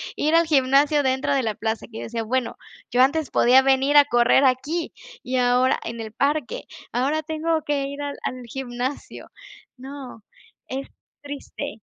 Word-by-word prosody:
Ir 310 Hz, +2 st, +1 dB
al 335 Hz, 0 st, +5 dB
gimnasio 285 Hz, 0 st, +3 dB
dentro 265 Hz, +1 st, 0 dB
de 270 Hz, -, +2 dB
la 215 Hz, -2 st, -2 dB
plaza, 220 Hz, 0 st, -3 dB
que 220 Hz, -, -8 dB
yo -, -, -6 dB
decía: 230 Hz, 0 st, -4 dB
"Bueno, 250 Hz, +2 st, -1 dB, 0.4 s
yo 245 Hz, +1 st, +3 dB
antes 295 Hz, +3 st, +2 dB
podía 255 Hz, +2 st, +5 dB
venir 270 Hz, +2 st, +3 dB
a 290 Hz, -, +8 dB
correr 240 Hz, +1 st, +4 dB
aquí, 285 Hz, +7 st, 0 dB, 0.3 s
y 255 Hz, +1 st, -2 dB
ahora 250 Hz, +1 st, +3 dB
en 230 Hz, 0 st, -6 dB
el 220 Hz, -1 st, -7 dB
parque 285 Hz, 0 st, -1 dB, 0.3 s
ahora 285 Hz, +6 st, 0 dB
tengo 315 Hz, +1 st, -1 dB
que 285 Hz, -2 st, 0 dB
ir 280 Hz, +1 st, -7 dB
al 285 Hz, 0 st, -5 dB
al 255 Hz, -1 st, -4 dB
gimnasio". 250 Hz, +2 st, -5 dB, 0.5 s
No, 265 Hz, -4 st, -10 dB, 0.4 s
es 270 Hz, +1 st, -5 dB, 0.4 s
triste. 285 Hz, -1 st, -7 dB
265 Hz, 165 wpm, -23 LUFS, 245-290 Hz, 0.5 s, a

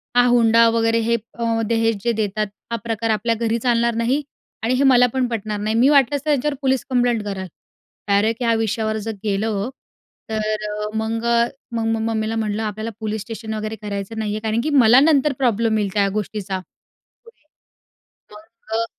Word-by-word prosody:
हा 245 Hz, 0 st, +6 dB
हुंडा 230 Hz, -1 st, +5 dB
वगैरे 230 Hz, 0 st, +2 dB
हे 235 Hz, -, +3 dB, 0.2 s
अ, 230 Hz, -1 st, 0 dB
दहेज 225 Hz, -1 st, +1 dB
जे 235 Hz, -, +2 dB
देतात 210 Hz, +1 st, -1 dB, 0.2 s
हा -, -, 0 dB
प्रकार 225 Hz, -1 st, -2 dB
आपल्या 230 Hz, +2 st, 0 dB
घरी 230 Hz, 0 st, 0 dB
चालणार 235 Hz, -1 st, +1 dB
नाहीआणि 245 Hz, -1 st, -2 dB
हे 275 Hz, -, +2 dB
मला 250 Hz, -2 st, +6 dB
पण 260 Hz, -1 st, +1 dB
पटणार 215 Hz, -3 st, -3 dB
नाही, 215 Hz, +2 st, -1 dB
मी 245 Hz, +4 st, +5 dB
वाटलंस 280 Hz, -1 st, +3 dB
तर -, -, -1 dB
त्यांच्यावर 295 Hz, 0 st, +1 dB
पोलीस 265 Hz, -2 st, +1 dB
कंप्लेंट 245 Hz, -3 st, +1 dB
करेन." 190 Hz, -2 st, -4 dB, 0.6 s
डायरेक्ट 215 Hz, +4 st, +1 dB
या 230 Hz, -, +3 dB
विषयावर 220 Hz, 0 st, -1 dB
जर -, -, -1 dB
गेलं, 210 Hz, +1 st, -1 dB, 0.6 s
तर 215 Hz, -1 st, -2 dB
अ, 210 Hz, 0 st, -3 dB
मग 225 Hz, +1 st, -2 dB
अ, 235 Hz, 0 st, +3 dB, 0.3 s
मग 230 Hz, -1 st, -1 dB
मग 225 Hz, 0 st, 0 dB
मम्मीला 220 Hz, 0 st, -1 dB
म्हटलं, 220 Hz, -1 st, -1 dB
"आपल्याला 215 Hz, +1 st, -4 dB
पोलीस 220 Hz, -1 st, -3 dB
स्टेशन 220 Hz, 0 st, -6 dB
वगैरे 215 Hz, 0 st, -4 dB
करायचं 205 Hz, +1 st, -5 dB
नाही 210 Hz, -1 st, -2 dB
आहे, 215 Hz, -, -2 dB
कारण 220 Hz, +1 st, 0 dB
की 305 Hz, -, -2 dB, 0.2 s
मला 240 Hz, +4 st, +7 dB
नंतर 295 Hz, -1 st, +3 dB
प्रॉब्लेम 230 Hz, -2 st, +2 dB
येईल 205 Hz, -2 st, 0 dB
त्या 200 Hz, -1 st, +2 dB
गोष्टीचा 205 Hz, -2 st, -3 dB, 0.6 s
पुढे." 465 Hz, -6 st, -20 dB, 0.9 s
मग 220 Hz, +1 st, -10 dB
अ 230 Hz, -, 0 dB
225 Hz, 180 wpm, -21 LUFS, 215-235 Hz, 0.9 s, मला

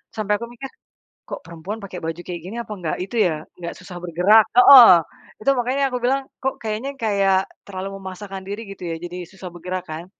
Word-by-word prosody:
Sampai 210 Hz, -1 st, 0 dB
aku 235 Hz, -, -4 dB
mikir, 270 Hz, +3 st, -8 dB, 0.6 s
kok -, -, -6 dB
perempuan 170 Hz, +6 st, -7 dB
pakai 185 Hz, -2 st, -7 dB
baju 165 Hz, +1 st, -4 dB
kayak 175 Hz, -2 st, -7 dB
gini 205 Hz, +5 st, -7 dB
apa 225 Hz, -, -11 dB
enggak 170 Hz, -4 st, -3 dB
itu 215 Hz, +5 st, -8 dB
ya, 155 Hz, -2 st, -3 dB, 0.2 s
enggak 170 Hz, -1 st, -6 dB
susah 180 Hz, -1 st, -10 dB
bergerak 180 Hz, +6 st, +5 dB
heeh. 250 Hz, -4 st, +10 dB, 0.5 s
Itu 275 Hz, -, +1 dB
makannya 255 Hz, +3 st, 0 dB
aku 250 Hz, -, -1 dB
bilang, 270 Hz, +2 st, +1 dB
kok 265 Hz, 0 st, -1 dB
kayaknya 220 Hz, +6 st, -3 dB
kayak 195 Hz, -3 st, +2 dB, 0.2 s
terlalu 195 Hz, 0 st, -6 dB
memasakkan 190 Hz, 0 st, -8 dB
diri 205 Hz, +3 st, -5 dB
gitu 185 Hz, -2 st, -8 dB
ya, 165 Hz, -, -3 dB
jadi 175 Hz, 0 st, -6 dB
susah 190 Hz, -1 st, -10 dB
bergerak, 180 Hz, +1 st, -5 dB
kan. 160 Hz, +2 st, -6 dB
195 Hz, 195 wpm, -22 LUFS, 180-225 Hz, 0.6 s, heeh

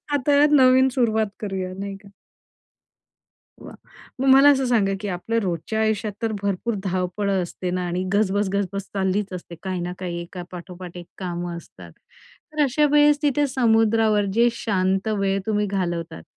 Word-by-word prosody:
आता 285 Hz, 0 st, +2 dB, 0.2 s
नवीन 260 Hz, -2 st, +6 dB
सुरुवात 230 Hz, -4 st, +1 dB
करूया 190 Hz, -3 st, -4 dB
नाही 200 Hz, 0 st, -5 dB
का? 200 Hz, 0 st, -17 dB, 1.5 s
वा! -, -, -11 dB, 0.5 s
मग 270 Hz, -, 0 dB
मला 270 Hz, +2 st, +8 dB
असं 270 Hz, -2 st, +2 dB
सांगा 215 Hz, -5 st, +2 dB
की 205 Hz, -, -4 dB
आपल्या 195 Hz, +5 st, -2 dB
रोजच्या 185 Hz, +4 st, -2 dB
आयुष्यात 220 Hz, -1 st, 0 dB
तर 225 Hz, -1 st, 0 dB
भरपूर 200 Hz, +3 st, -1 dB
धावपळं 190 Hz, +1 st, -1 dB
असते 180 Hz, +1 st, -5 dB
ना 180 Hz, 0 st, -2 dB
आणि 175 Hz, +1 st, -2 dB
गजबज 205 Hz, -1 st, +1 dB
गजबज 200 Hz, 0 st, -2 dB
चाललीच 195 Hz, +1 st, -1 dB
असते 175 Hz, -1 st, -8 dB
काही 185 Hz, -2 st, -3 dB
ना 175 Hz, +1 st, -3 dB
काही 175 Hz, -2 st, -4 dB
एका 175 Hz, +1 st, -8 dB
पाठोपाठ 180 Hz, 0 st, -9 dB
एक 175 Hz, -1 st, -9 dB
कामं 175 Hz, -2 st, -4 dB
असतात. 170 Hz, -, -12 dB, 0.6 s
तर 300 Hz, -1 st, +1 dB
अशावेळेस 295 Hz, +1 st, +4 dB
तिथे 290 Hz, 0 st, +2 dB
समुद्रावर 225 Hz, -4 st, +2 dB
जे 235 Hz, +2 st, +4 dB
शांत 195 Hz, -3 st, 0 dB
वेळ 195 Hz, 0 st, +1 dB
तुम्ही 210 Hz, -1 st, 0 dB
घालवतात. 175 Hz, -4 st, -3 dB
200 Hz, 155 wpm, -23 LUFS, 185-230 Hz, 1.5 s, मला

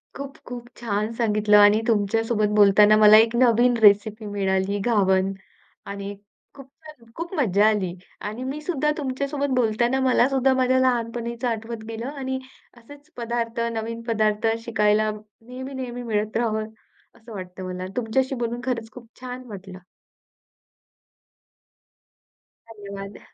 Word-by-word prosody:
खूप-खूप 270 Hz, -4 st, -9 dB
छान 215 Hz, -1 st, -2 dB
सांगितलं 210 Hz, -2 st, +3 dB
आणि 205 Hz, +1 st, +6 dB
तुमच्यासोबत 220 Hz, 0 st, +1 dB
बोलताना, 205 Hz, +1 st, +6 dB
मला 215 Hz, 0 st, +8 dB
एक 225 Hz, +1 st, +4 dB
नवीन 240 Hz, 0 st, +4 dB
रेसिपी 215 Hz, +1 st, +4 dB
मिळाली 195 Hz, -1 st, -1 dB
घावण 195 Hz, -4 st, +2 dB, 0.5 s
आणि 200 Hz, 0 st, -6 dB, 0.4 s
खूप 275 Hz, -2 st, -13 dB
छान, 305 Hz, -2 st, -16 dB
खूप 340 Hz, +3 st, -6 dB
मज्जा 210 Hz, -5 st, +3 dB
आली 195 Hz, -5 st, -1 dB, 0.4 s
आणि 225 Hz, +4 st, -7 dB
मी 275 Hz, +4 st, -5 dB
सुद्धा 300 Hz, -3 st, 0 dB
तुमच्यासोबत 280 Hz, 0 st, -2 dB
बोलताना, 240 Hz, +2 st, +1 dB
मलासुद्धा 265 Hz, +1 st, +3 dB
माझ्या 260 Hz, 0 st, +2 dB
लहानपणीचं 235 Hz, -1 st, -1 dB
आठवत 225 Hz, 0 st, -4 dB
गेलं 225 Hz, +2 st, -5 dB
आणि 265 Hz, -2 st, -4 dB, 0.4 s
असेच 285 Hz, +6 st, -16 dB
पदार्थ 235 Hz, -1 st, -3 dB
नवीन 230 Hz, +1 st, -4 dB
पदार्थ 215 Hz, -1 st, +1 dB, 0.2 s
शिकायला 215 Hz, -1 st, +2 dB
नेहमी-नेहमी 245 Hz, +4 st, -8 dB
मिळत 215 Hz, -1 st, -1 dB
राहावं 220 Hz, -2 st, -1 dB, 0.5 s
असं 230 Hz, +1 st, -15 dB
वाटतं 185 Hz, -1 st, -8 dB
मला. 185 Hz, 0 st, -5 dB
तुमच्याशी 260 Hz, +3 st, 0 dB
बोलून 240 Hz, 0 st, -3 dB
खरंच 235 Hz, -3 st, -3 dB
खूप 245 Hz, -2 st, -13 dB
छान 255 Hz, 0 st, -7 dB
वाटलं. 190 Hz, -3 st, -10 dB, 2.9 s
धन्यवाद. 200 Hz, -2 st, -9 dB
230 Hz, 120 wpm, -23 LUFS, 210-250 Hz, 2.9 s, मला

